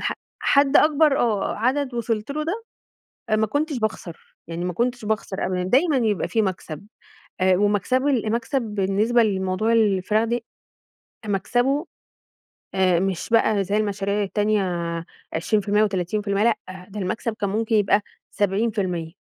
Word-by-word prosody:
ح - - -1 0.3
حد 280 0 +4
أكبر، 300 -2 +4
آه 215 -5 0
عدد 255 +3 0
وصلت 225 0 -2
له 305 +2 -2
ده 410 +8 -3 0.7
ما 220 - +2
كنتش 290 +4 -1
باخسر، 190 -6 -5
يعني 170 +1 -4
ما 180 - -2
كنتش 240 +4 -1
باخسر 210 -2 -2
أبدًا، 180 -1 -1
دايمًا 270 - +3
يبقى 215 -8 0
في 225 -2 +1
مكسب، 180 -3 -4 0.6
آآ، 185 0 +4
ومكسبه 205 +7 +1
ال 230 -6 0
مكسب 235 +4 -1
بالنسبة 210 +2 +1
لموضوع 190 +1 0
الفراخ 210 -1 +2
دي 235 0 -2 0.8
مكسبه 245 - 0 0.9
آآ، 185 -2 +3
مش 190 0 -2
بقى 220 -3 +3
زي 200 +3 -1
المشاريع 205 -1 -1
التانية 210 +1 +1 0.7
20% 210 +5 +1
و30%، 200 +1 -1
لأ، 230 -1 +3 0.3
ده 210 +1 -7
المكسب 210 +4 -2
كان 200 -1 -1
ممكن 220 +3 0
يبقى 205 0 +3 0.3
70%. 195 -5 -1
215 Hz, 135 wpm, -23 LUFS, 195-235 Hz, 0.9 s, حد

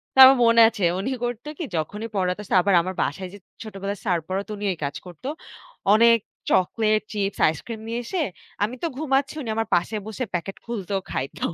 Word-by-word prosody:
তো - - +2
আমার 265 0 +7
মনে 230 0 +6
আছে 220 -4 -5 0.2
উনি 205 +7 -2 0.2
করতো 240 +3 -5
কি - - -2
যখনই 210 +8 -4
পড়াতে 180 +1 0
আসছে 200 - -1
আবার 195 +1 +2
আমার 185 +2 -4
বাসায় 185 +6 -4
যে 205 - -9 0.3
ছোটবেলায় 200 -2 -5
স্যার 180 -4 +2
পড়াতো 195 +2 -3
উনি 205 - -4
এই - - -11
কাজ 140 - -4
করতো। 175 +8 -9 0.7
অনেক 230 +1 +6 0.3
চকোলেট, 215 +3 +2
চিপস, 200 -1 -2
আইসক্রিম 215 +9 -4
নিয়ে 230 +1 -2
এসে, 355 +7 -2 0.4
আমি 220 +5 -1
তো 335 - +2
ঘুমাচ্ছি 275 -2 +1
উনি 230 - -5
আমার 225 0 -1
পাশে 175 +6 0
বসে 220 +4 -3
প্যাকেট 180 +3 -3
খুলতো, 205 -5 -4 0.2
খাইত 135 - -4
210 Hz, 190 wpm, -24 LUFS, 185-230 Hz, 0.7 s, আমার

